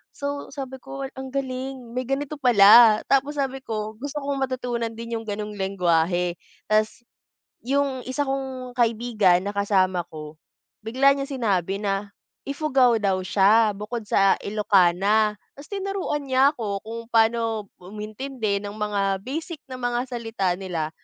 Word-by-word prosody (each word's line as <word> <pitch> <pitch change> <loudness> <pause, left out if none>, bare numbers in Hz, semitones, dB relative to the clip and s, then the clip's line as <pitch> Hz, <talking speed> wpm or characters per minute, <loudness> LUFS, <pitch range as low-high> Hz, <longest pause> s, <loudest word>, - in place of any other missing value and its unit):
So 285 0 -4
sabi 265 -1 -6
ko 275 0 -7
wal 265 - -8
ang 265 0 -6
galing 260 -2 -4
may 255 0 -3
ganito 285 +2 -3
pala. 220 -2 +7
Tapos 275 +2 +2
sabi 270 -1 -1
ko 215 -3 -4
gusto 285 +2 -4
kong 280 -1 -2
matutunan 245 -3 -2
din 230 0 -4
yung 225 - -11
ganong 210 +1 -4
lengwahe 180 -2 +1 0.4
tas. 215 +2 +1 0.6
Yung 275 0 0
isa 285 +3 -1
kong 265 -2 -4
kaibigan 225 -6 +2
na 205 - -3
kasama 190 -3 +2
ko 155 -1 -9 0.5
bigla 265 +5 +4
niya 275 0 -4
sinabi 195 - 0
na 200 0 -1 0.4
ifugao 270 -5 +3
daw 195 -3 0
siya. 205 +3 +4
Bukod 215 +1 -5
sa 195 0 +4
ilokana 205 +1 +3 0.2
tas 285 - -11
tinuruan 390 -7 -3
niya 265 +2 +4
ako 205 -4 -3
kung 230 +1 -5
pano 225 -2 +2 0.2
umintindi 215 +2 -4
ng 205 +1 -6
mga 200 -2 0
basic 315 +3 -4
na 255 - -6
mga 245 +1 -1
salita 225 -6 -1
nila. 170 -5 -3
230 Hz, 145 wpm, -24 LUFS, 200-265 Hz, 0.6 s, pala